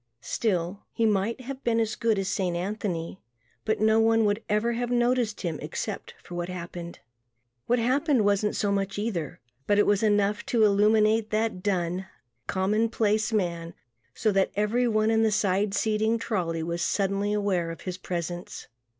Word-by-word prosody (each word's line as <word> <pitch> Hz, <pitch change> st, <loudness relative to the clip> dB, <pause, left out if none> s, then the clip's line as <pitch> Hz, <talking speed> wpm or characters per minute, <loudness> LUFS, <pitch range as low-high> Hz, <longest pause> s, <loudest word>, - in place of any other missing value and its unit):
Still, 185 Hz, -3 st, -1 dB
he 230 Hz, -, 0 dB
might 215 Hz, +4 st, +1 dB
have 270 Hz, +1 st, -7 dB
been 230 Hz, -1 st, +2 dB
as 220 Hz, -1 st, 0 dB
good 225 Hz, -2 st, +1 dB
as 195 Hz, -1 st, -1 dB
Saint 185 Hz, -3 st, -1 dB
Anthony 185 Hz, -2 st, -3 dB, 0.4 s
but 220 Hz, -, 0 dB
no 220 Hz, +1 st, +4 dB
one 225 Hz, 0 st, +4 dB
would 205 Hz, +1 st, +1 dB
ever 210 Hz, +3 st, +1 dB
have 240 Hz, +1 st, -2 dB
noticed 240 Hz, -2 st, +1 dB
him 170 Hz, -5 st, -3 dB
except -, -, -5 dB
for -, -, -11 dB
what 175 Hz, 0 st, -3 dB
happened. 175 Hz, -1 st, -7 dB, 0.7 s
What 245 Hz, -, +3 dB
happened 255 Hz, 0 st, +2 dB
wasn't 205 Hz, +1 st, +1 dB
so 205 Hz, -, 0 dB
much 195 Hz, -1 st, -1 dB
either 205 Hz, -8 st, -3 dB, 0.3 s
but 205 Hz, -, +3 dB
it 205 Hz, -, +5 dB
was 205 Hz, -1 st, +2 dB
enough 205 Hz, -1 st, +2 dB
to 230 Hz, -3 st, +3 dB
illumine 215 Hz, +2 st, +4 dB
that 215 Hz, -3 st, -1 dB
dun, 185 Hz, -1 st, -1 dB, 0.4 s
common 210 Hz, +4 st, +1 dB
place 220 Hz, 0 st, +1 dB
man 170 Hz, -5 st, -2 dB, 0.4 s
so 215 Hz, -, +1 dB
that 195 Hz, -1 st, +2 dB
everyone 215 Hz, +1 st, +2 dB
in 225 Hz, 0 st, +3 dB
the 220 Hz, -, +4 dB
side 200 Hz, 0 st, +1 dB
seating 220 Hz, +2 st, +1 dB
trolley 175 Hz, -8 st, -2 dB
was 170 Hz, +1 st, -3 dB
suddenly 200 Hz, +2 st, 0 dB
aware 200 Hz, -5 st, 0 dB
of 165 Hz, -, -7 dB
his 185 Hz, -1 st, -5 dB
presence. 175 Hz, -1 st, -5 dB
205 Hz, 165 wpm, -27 LUFS, 185-225 Hz, 0.7 s, it